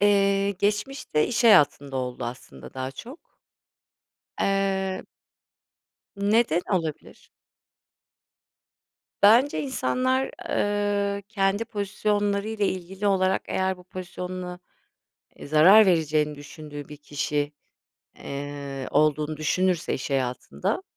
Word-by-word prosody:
Eee, 200 Hz, -1 st, +3 dB
geçmişte, 205 Hz, -, -1 dB
iş 240 Hz, 0 st, -1 dB
hayatında 145 Hz, -9 st, +5 dB
oldu 125 Hz, -1 st, -3 dB
aslında 120 Hz, -, -9 dB
daha 130 Hz, 0 st, -4 dB
çok. 245 Hz, -, -10 dB, 1.2 s
Eee 195 Hz, -1 st, 0 dB, 1.1 s
Neden 200 Hz, -3 st, +2 dB
olabilir? 165 Hz, -5 st, -4 dB, 1.9 s
Bence 235 Hz, +8 st, +5 dB
insanlar, 260 Hz, -1 st, 0 dB, 0.2 s
eee, 205 Hz, -1 st, 0 dB
kendi 200 Hz, 0 st, 0 dB
pozisyonları 205 Hz, -1 st, -1 dB
ile 215 Hz, -2 st, 0 dB
ilgili 190 Hz, +2 st, -4 dB
olarak, 190 Hz, -1 st, +2 dB
eğer 190 Hz, 0 st, -1 dB
bu 180 Hz, -, -16 dB
pozisyonuna, 180 Hz, 0 st, -6 dB, 0.8 s
e, -, -, -10 dB
zarar 180 Hz, +9 st, +7 dB
vereceğini 155 Hz, -3 st, +2 dB
düşündüğü 145 Hz, 0 st, -10 dB
bir 150 Hz, -, -9 dB
kişi, 145 Hz, 0 st, -2 dB, 0.7 s
eee, 140 Hz, -1 st, -6 dB
olduğunu 155 Hz, 0 st, +2 dB
düşünürse 180 Hz, +3 st, 0 dB
iş 135 Hz, -, -4 dB
hayatında, 125 Hz, -, -2 dB
185 Hz, 95 wpm, -25 LUFS, 150-205 Hz, 1.9 s, zarar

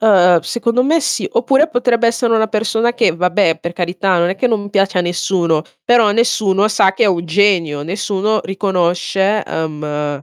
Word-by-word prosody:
uhm, 180 Hz, -5 st, +4 dB
secondo 235 Hz, +7 st, -1 dB
me 320 Hz, +4 st, +2 dB
sì. 315 Hz, -, -2 dB
Oppure 305 Hz, -, +2 dB
potrebbe 245 Hz, -4 st, 0 dB
essere 230 Hz, 0 st, 0 dB
una 220 Hz, 0 st, +2 dB
persona 225 Hz, +2 st, 0 dB
che, 240 Hz, -, +1 dB
vabbè, 175 Hz, -1 st, +1 dB
per 170 Hz, -, -5 dB
carità 180 Hz, +1 st, -1 dB
non 170 Hz, +1 st, +1 dB
è 195 Hz, -, -4 dB
che 250 Hz, -, 0 dB
non 210 Hz, -3 st, -2 dB
piace 195 Hz, -2 st, 0 dB
a -, -, +2 dB
nessuno, 175 Hz, -2 st, -1 dB, 0.2 s
però 235 Hz, -3 st, +3 dB
nessuno 210 Hz, -3 st, +1 dB
sa 195 Hz, -3 st, +2 dB
che 200 Hz, -, +1 dB
è -, -, +3 dB
un 175 Hz, -4 st, 0 dB
genio, 170 Hz, -5 st, +1 dB
nessuno 205 Hz, +5 st, -2 dB
riconosce 190 Hz, +1 st, -1 dB
uhm 150 Hz, -2 st, -4 dB
195 Hz, 175 wpm, -16 LUFS, 175-225 Hz, 0.2 s, uhm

